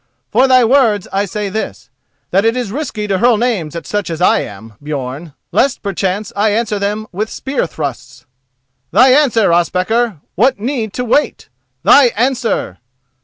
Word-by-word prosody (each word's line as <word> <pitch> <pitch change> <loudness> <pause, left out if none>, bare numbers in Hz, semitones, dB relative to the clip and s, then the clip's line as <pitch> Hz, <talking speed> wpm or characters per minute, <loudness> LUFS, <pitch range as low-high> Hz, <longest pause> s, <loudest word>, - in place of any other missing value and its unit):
"For 255 +5 +4
thy 255 -2 +5
words, 225 -6 +2
I 200 +1 +1
say 205 +2 -4
this: 215 +3 -5 0.4
that 195 +2 +3
it 225 +2 +1
is 245 -6 -3
risky 235 -5 -4
to 195 -2 -1
hurl 240 0 +4
names 210 -10 -1
at 170 - -6
such 205 -3 -3
as 165 -1 -4
I 180 - +3
am, 105 +2 -8
Björn, 145 +1 -5 0.2
lest 275 - +1
perchance 200 +1 -2
I 210 +2 +2
answer 215 -1 -1
them 210 +2 -2
with 215 +4 -3
spear 265 -8 -3
thrusts. 135 -5 -6 0.6
Thy 260 - +5
answer, 255 - +3
Ospakar! 185 +4 0
What 250 +5 +2
need 230 -2 -2
to 250 - -3
wait? 285 +5 0 0.3
Thy 280 - +7
answer!" 240 - -1
210 Hz, 165 wpm, -15 LUFS, 180-245 Hz, 0.6 s, Thy